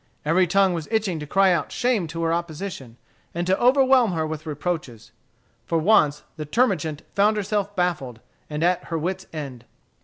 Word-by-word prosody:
Every 180 +4 +3
tongue 195 +1 +3
was 165 -3 -4
itching 210 -7 0
to 150 - -7
cry 195 +3 +4
out 170 - -2
shame 240 -8 0
to 165 +2 -4
her 165 0 +1
opposition, 170 -7 -5 0.4
and 175 +1 -1
to 185 +1 +3
overwhelm 255 -4 +4
her 160 -1 -1
with 155 0 -6
reproaches. 150 -7 -4 0.6
For 165 - +1
once 155 -5 +3
the 155 - -5
termagant 160 - 0
found 210 +2 +3
herself 205 0 -2
baffled, 150 - -1 0.3
and 150 +1 -3
at 180 +1 +1
her 165 - -3
wits' 185 +4 -3
end. 140 -6 -7
175 Hz, 175 wpm, -23 LUFS, 155-200 Hz, 0.6 s, cry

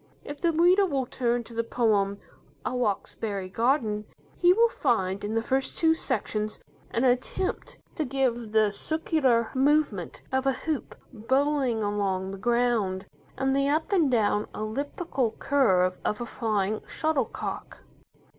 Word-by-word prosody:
If 290 0 -8
the 340 - +3
reader 350 +5 +5
will 275 -6 -1
turn 240 -1 -1
to 235 - -12
the 230 0 -1
poem, 210 -4 +1 0.5
"A - - -1
Roxbury 205 -3 -2
Garden", 225 -1 0 0.3
he 350 0 +5
will 460 +5 +5
find 205 - 0
in 210 +2 -2
the 225 - +1
first 265 +2 0
two 320 -1 +4
sections 215 -7 -2 0.3
an 230 - -1
attempt 255 +9 -1 0.2
to 315 - +1
give 250 -5 -1
the 215 -1 +3
circular 265 - +1
movement 270 - +1
of 265 +1 0
a 270 - +3
hoop 305 +2 -4 0.2
bowling 260 0 +1
along 195 -2 -1
the 195 - -7
ground, 235 -5 +1 0.3
and 270 0 +1
the 275 0 +2
up 315 +6 0
and 340 -8 +3
down, 215 -3 +1
elliptical 255 +2 -2
curve 185 -10 +2
of 210 - -1
a 240 - -3
flying 215 -3 -1
shuttlecock. 310 -6 -3
240 Hz, 145 wpm, -27 LUFS, 210-280 Hz, 0.5 s, reader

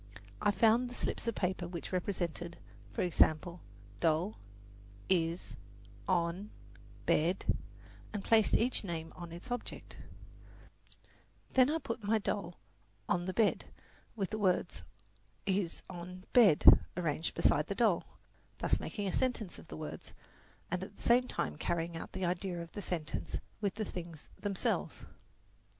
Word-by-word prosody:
I - - +4
found 225 +5 +4
the 245 - -9
slips - - -3
of 230 - 0
paper 180 -1 -1
which 170 -1 -6
represented, 175 -2 -2 0.3
for - - -1
example, 170 0 +2 0.4
"doll," 165 +6 +1 0.7
"is," 170 -2 +1 0.5
"on," 180 +2 +1 0.6
"bed" 170 +5 +2 0.7
and 205 -2 -4
placed 220 -2 +5
each 245 +1 +1
name 165 -4 -4
on 175 -1 -8
its 175 +9 -8
object; 245 -1 -5 1.5
then 260 0 +6
I 315 - +2
put 230 -7 -5
my 215 +2 +3
doll 200 -4 -2 0.5
on 175 0 +1
the 185 - -1
bed 220 0 +2 0.5
with 195 -4 -2
the 215 - -2
words 185 -3 +1 0.6
is, 190 -3 0
on, 180 0 -8
bed 210 -11 +6 0.3
arranged 160 -2 -1
beside 150 - +3
the 200 - -2
doll, 205 -5 +3 0.5
thus - - +1
making 205 -2 -3
a 190 - -1
sentence 240 -7 -1
of - - -13
the - - -7
words, 155 -1 -7 0.6
and 180 +1 -1
at 195 +1 -9
the - - -12
same 250 +1 +5
time 75 - -2
carrying 170 - -1
out 165 - -6
the 190 - -1
idea 175 0 -1
of 170 -1 -7
the 205 - -5
sentence 165 -5 -3 0.2
with 200 -2 0
the 215 0 -2
things 170 -5 -8
themselves. 200 -2 -1
185 Hz, 145 wpm, -33 LUFS, 170-210 Hz, 1.5 s, then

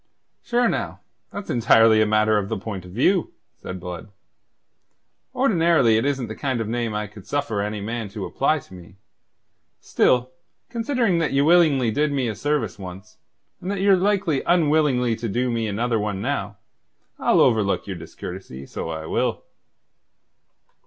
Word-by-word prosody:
"Sure, 240 0 +1
now, - - -3 0.3
that's 205 0 -6
entirely 115 -2 +5
a 110 - +3
matter 110 0 +3
of 100 -1 -4
the - - -2
point 95 -2 -6
of 90 - -11
view," 170 - +1 0.2
said 95 0 -7
Blood. 90 +2 -7 1.3
"Ordinarily 170 - +3
it 115 - 0
isn't 135 -3 0
the 110 - -6
kind 130 -1 -2
of 115 - -2
name 115 -1 -2
I 105 0 -2
could 105 -1 -13
suffer 130 -8 -1
any 105 0 -3
man 110 0 -4
to 100 -1 -6
apply 155 +3 +1
to - - -17
me. 90 0 -13 0.8
Still, 125 0 +2 0.4
considering 235 -6 +1
that 160 -4 0
ye 140 - +3
willingly 150 -7 +4
did 150 +5 +1
me 135 -3 0
a 110 - -2
service 115 -4 -2
once, 95 +3 -10 0.4
and 185 - -5
that 200 -1 -2
ye're 195 0 +5
likely 190 -6 +1
unwillingly 150 -8 +3
to 115 0 -4
do 125 +4 0
me 115 -1 -1
another 115 +2 0 0.2
now, 105 -1 -3 0.6
I'll - - +3
overlook 110 -5 +2
your 95 - -5
discourtesy, 80 -4 -9
so 80 - -6
I 80 -1 -5
will." - - -1
115 Hz, 160 wpm, -23 LUFS, 105-150 Hz, 1.3 s, entirely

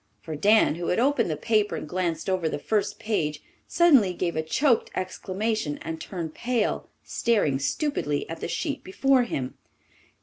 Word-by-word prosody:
For 160 - -6
Dan, 210 +3 +4
who 170 - -2
had 180 - +1
opened 250 -5 +2
the 155 - -2
paper 215 +3 +1
and - - -5
glanced 170 -1 -2
over 185 -4 +1
the - - -2
first 205 +7 -1
page, 155 -9 -2 0.2
suddenly 275 - +5
gave 170 -1 -1
a 160 - +1
choked 235 - +2
exclamation 185 -2 -2
and 160 0 -5
turned 170 -5 -5
pale, 235 -3 -1
staring 200 - +1
stupidly 150 - -1
at 165 0 -6
the - - -3
sheet 170 - -3
before 255 +6 +2
him. 130 - -3
185 Hz, 165 wpm, -26 LUFS, 160-230 Hz, 0.2 s, suddenly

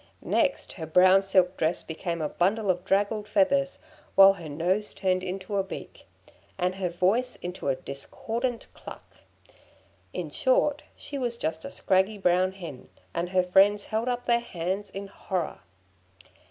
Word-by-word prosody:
Next, - - +1
her 160 -4 -7
brown 185 +4 +6
silk 190 -2 +2
dress 160 +2 0
became 170 0 -4
a - - +1
bundle 200 +3 +1
of 180 0 -4
draggled 205 +2 0
feathers, 275 +8 +2 0.4
while 195 0 +9
her 170 -5 -9
nose 180 +8 -1
turned 185 -1 +1
into 190 +2 -4
a 195 - +2
beak, 190 - -9 0.5
and 180 0 0
her 185 -1 -2
voice 195 +9 +1
into 180 -3 -5
a 135 - +2
discordant 230 - -4
cluck; - - -10 1.1
in - - -5
short, - - +2 0.2
she 280 - -6
was 240 -2 -2
just 160 -5 -3
a - - -5
scraggy 190 +3 +1
brown 185 0 +2
hen, 165 -9 -9 0.2
and 170 +1 -2
her 185 0 +2
friends 195 +3 +4
held 220 +2 -2
up 245 0 -2
their 235 -1 +3
hands 190 -2 -4
in 195 +1 -6
horror. 190 -2 -4
190 Hz, 155 wpm, -27 LUFS, 180-210 Hz, 1.1 s, while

